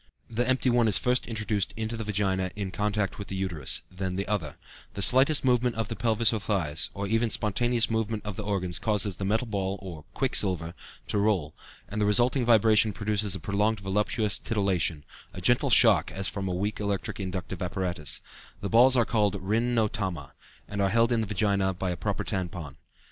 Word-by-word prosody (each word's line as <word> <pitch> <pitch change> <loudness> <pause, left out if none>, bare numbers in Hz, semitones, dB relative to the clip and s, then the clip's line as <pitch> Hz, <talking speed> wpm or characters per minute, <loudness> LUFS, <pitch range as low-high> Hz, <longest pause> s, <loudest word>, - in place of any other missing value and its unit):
The 120 +3 0
empty 130 0 +2
one 120 -1 +3
is 100 -4 +4
first 125 +4 0
introduced 110 -3 -2
into 110 +1 -3
the 115 - -4
vagina 95 -3 -1
in 100 -2 -4
contact 105 -1 -2
with 100 - -6
the 95 - -5
uterus, 90 -7 0
then 95 0 -4
the 100 +1 -3
other; 95 -9 -2 0.4
the 100 - -3
slightest 135 +5 +5
movement 125 -1 +2
of 115 -2 -3
the 115 - -4
pelvis 115 +1 +2
or 110 - -1
thighs, 90 -7 -2
or 100 0 -3
even 115 +3 +1
spontaneous 115 +3 +1
movement 110 -1 -2
of 105 -2 -4
the - - -5
organs, 95 -4 -2
causes 105 -3 0
the 95 - -4
metal 110 +5 +1
ball 100 -3 -2
(or 90 -5 -8
the - - -18
quicksilver) 90 - +1 0.3
to 105 - -1
roll, 95 -8 0 0.3
and 105 +2 -4
the 105 - +2
resulting 120 +5 +3
vibration 110 -2 +4
produces 105 -1 -1
a - - -5
prolonged 105 +4 0
voluptuous 105 +2 0
titillation, 90 -8 0 0.3
a - - -7
gentle - - +2
shock - - +5
as 95 +1 -3
from 95 +1 -4
a - - -2
weak 100 +4 -2
electric 100 -1 -3
inductive 95 -1 -5
apparatus; 90 -4 -2 0.4
the 100 - -4
balls 125 +3 +5
are 120 - +4
called 105 -4 +1
rin 115 +5 0
no 110 -2 +3
tama, 95 - -5 0.3
and 100 0 -3
are 100 - +2
held 115 +3 +2
in 115 -1 +2
the 110 - -3
vagina 100 -2 +1
by 90 0 -2
a - - -2
paper - - -3
tampon. 90 -6 -4
105 Hz, 200 wpm, -27 LUFS, 95-115 Hz, 0.4 s, slightest